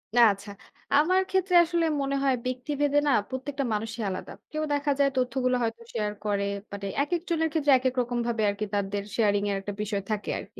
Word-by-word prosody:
আ 245 - +5
আচ্ছা। 200 +1 -11 0.5
আমার 365 +6 +4
ক্ষেত্রে 380 -1 +1
আসলে 340 0 0 0.2
মনে 275 0 -1
হয় 265 -2 +3
ব্যক্তিভেদে 285 +3 0
না - - +4 0.2
প্রত্যেকটা 270 +2 -3
মানুষই 220 +2 -3
আলাদা। 185 - -5 0.2
কেউ 310 0 -2
দেখা 285 0 +1
যায় 280 0 +5
তথ্যগুলো 255 0 +1
হয়তো 230 0 -2
শেয়ার 210 -2 -1
করে। 200 -1 +1 0.3
মানে 200 0 -6 0.2
একেকজনের 335 0 -1
ক্ষেত্রে 295 -3 +2
একেক 255 0 -1
রকমভাবে 235 -1 -1
আরকি 205 +1 -2
তাদের 200 0 -1
শেয়ারিংয়ের 205 -2 +2
একটা 205 +1 -5
বিষয় 205 -1 -2
থাকে 210 -1 -2
আরকি। - - -12
255 Hz, 175 wpm, -27 LUFS, 210-290 Hz, 0.5 s, আ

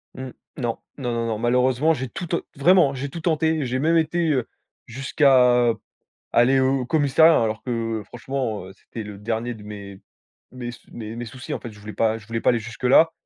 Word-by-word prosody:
Mmh, 130 0 -6 0.3
Non. 120 -4 -2 0.2
Non, 125 -3 -3
non, 115 0 -1
non. 110 -2 -1
Malheureusement, 125 +6 +2
j'ai 130 -3 -4
tout 175 +6 -6
ten 170 - 0 0.2
vraiment, 160 0 +5
hein, - - -7
j'ai 140 +2 -4
tout 165 +3 -7
tenté. 160 -3 +1
J'ai 130 +1 -1
même 165 +3 +3
été, 165 +1 +1
heu, 130 -4 0 0.4
jusqu'à 125 -2 +4 0.6
aller 130 +3 +4
au 130 -1 +1
commissariat, 160 +2 +5
hein, - - +3
alors 110 0 -2
que 115 -3 -2
franchement, 120 -5 -4
heu, 95 - -11
c'était 110 +3 -9
le 105 -1 -9
dernier 115 +3 -3
de 105 - -12
mes 100 -2 -9 0.5
mes 120 -1 -6
sous 120 - -15
mes 115 -1 -7
mes 120 - -4
soucis. 125 +2 -8
En - - -5
fait, 120 - -7
je 105 - -15
voulais 105 +1 -8
pas 110 0 +1
je 105 - -16
voulais 115 0 -3
pas - - +1
aller 120 - +2
jusque-là. 125 +8 +3
125 Hz, 215 wpm, -23 LUFS, 115-140 Hz, 0.6 s, vraiment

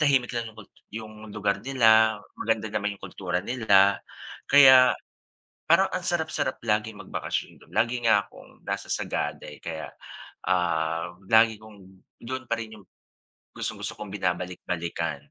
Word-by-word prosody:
tahimik 135 -5 +3
lang 115 -1 -2
'yong 110 - -20
kul 110 - -12 0.3
'yong 110 -1 -7 0.2
lugar 100 -1 0
nila 110 -4 +4 0.2
maganda 110 -1 -1
naman 105 -1 -1
'yong - - -31
kultura 90 -2 -3
nila 100 -5 +4 0.5
kaya 130 -2 +8 0.8
parang 190 +4 +5
ang 185 -1 -2
sarap-sarap 160 -6 -1
laging 105 -1 -1
magbakasyon - - -4
do'n. - - -23
Lagi 120 +3 +1
nga 105 -3 +4
akong - - -17
nasa - - -3
Sagada - - -2
eh, 75 - -10
kaya, 80 -1 -5 0.6
um, 85 0 -1
lagi 110 0 +5
kong 110 -1 -14 0.4
do'n 130 +2 -5
pa 115 - +1
rin 110 -1 -7
'yong 100 - -17 0.7
gustong-gusto - - -4
kong 105 - -7
binabalik-balikan. 90 -5 -3
110 Hz, 140 wpm, -26 LUFS, 95-120 Hz, 0.8 s, kaya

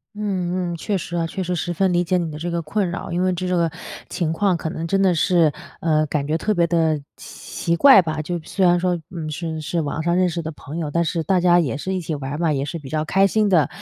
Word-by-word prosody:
嗯 185 -4 -2
嗯， - - -4
确 205 +5 -2
实 175 -2 -4
啊， 165 - 0
确 165 +4 -4
实 180 0 -1
十 175 +1 -2
分 190 +2 +1
理 175 0 +2
解 180 +1 +1
你 170 -2 -2
的 150 - -7
这 170 +3 -4
个 170 0 -1
困 190 +5 -1
扰。 175 - -5
因 175 +2 0
为 185 0 +2
这 180 +1 -3
个 165 -1 +1 0.4
情 170 -4 -1
况 190 +2 +1
可 165 -1 -3
能 160 +1 -4
真 195 +3 +1
的 185 -3 +3
是， 165 -1 +3 0.3
呃， 155 -2 +2
感 145 -1 -2
觉 155 +2 +1
特 215 +5 0
别 170 -3 +2
地 160 -3 +1 0.2
奇 170 - -4
怪 270 +4 +8
吧。 155 -1 -2
就 175 +3 -3
虽 190 - -2
然 175 -1 +5
说， 180 -1 0
嗯， 165 -4 -6
是 160 0 -4
是 165 +2 -2
网 150 +1 -3
上 170 +1 +1
认 180 0 +3
识 170 0 -4
的 160 - -4
朋 150 0 -9
友， 155 -3 -3
但 170 +3 +1
是 165 0 -1
大 185 +4 +2
家 175 0 +5
也 145 -8 0
是 190 +6 -3
一 - - -1
起 165 -2 -4
玩 140 -2 -4
儿 - - -3
嘛， 165 -2 +1
也 135 -1 -1
是 150 +4 -4
比 145 -5 -10
较 155 +1 -1
开 195 +5 +3
心 210 +1 +2
的， 165 -6 +4
170 Hz, 300 characters per minute, -22 LUFS, 160-180 Hz, 0.4 s, 怪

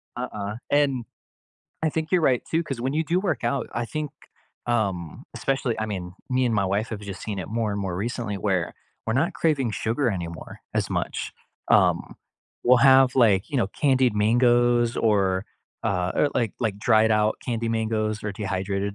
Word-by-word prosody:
Uh-uh, 105 -4 -4 0.2
and 140 -4 +2 0.8
I 160 - +3
think 160 +1 -2
you're 180 - +3
right 130 -6 +2
too, 165 +1 +2
cause 135 -7 -5
when 130 +2 -1
you 160 +1 +1
do 170 +4 +1
work 170 - -2
out, 120 +1 0
I 120 - -2
think, 150 +4 -4 0.6
um, 100 -9 -1
especially 135 -3 -1
I 110 - -1
mean, 90 -4 -5 0.2
me 130 0 +2
and 115 - +1
my 100 -2 +2
wife 100 +4 0
have 110 -3 -5
just 100 -2 -7
seen 105 -3 -4
it 90 - -5
more 110 -1 -1
and 100 - -3
more 95 -3 -3
recently 110 0 -3
where 95 -4 -1 0.3
we're 110 - 0
not 160 +8 +1
craving 140 -7 +1
sugar 120 +5 0
anymore 85 -4 -6
as - - 0
much, - - -3 0.4
um, - - +3 0.5
we'll 125 +1 +6
have 130 0 +6
like, 105 -7 +4
you 145 - -1
know, 120 - +2
candied 130 -1 +2
mangoes 120 +2 +3
or, 100 -3 +2 0.4
uh 90 0 0
or 145 - +3
like, 115 -4 0
like 110 -4 -1
dried 110 0 +4
out 105 0 +2
candy 115 -2 -2
mangoes 110 -1 -1
or 105 - -2
dehydrated, 100 0 -2
115 Hz, 185 wpm, -25 LUFS, 100-130 Hz, 0.8 s, we'll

